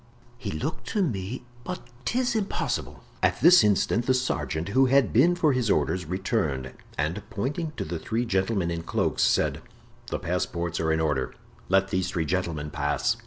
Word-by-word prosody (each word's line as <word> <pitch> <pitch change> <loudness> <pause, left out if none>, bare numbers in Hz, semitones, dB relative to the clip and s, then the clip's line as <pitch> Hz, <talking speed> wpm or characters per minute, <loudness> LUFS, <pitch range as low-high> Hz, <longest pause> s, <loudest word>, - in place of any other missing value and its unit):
"He 115 -5 -4
looked 80 - -4
to 205 - +1
me—but 120 - -4 0.3
'tis 250 0 +1
impossible." 210 -3 -2 0.2
At - - +2
this 175 -7 +8
instant 105 +3 +2
the 130 - +4
sergeant, 85 -9 -1
who 130 +5 +4
had 135 -3 +3
been 160 +10 +5
for 155 -5 +3
his 125 -4 0
orders, 85 +2 +1
returned, 80 - -1 0.2
and 80 +8 -1
pointing 150 +10 -3
to - - -2
the 80 +1 -4
three 115 +8 -1
gentlemen 95 -3 0
in 85 -1 -3
cloaks, - - 0
said: - - +2 0.5
"The - - -2
passports 85 -1 -2
are 80 -1 +1
in 80 0 +1
order; 75 -5 -1 0.3
let 95 +1 +3
these 95 -1 0
three 85 -3 -1
gentlemen 80 -4 -2
pass." 75 -3 0
95 Hz, 165 wpm, -26 LUFS, 85-130 Hz, 0.5 s, this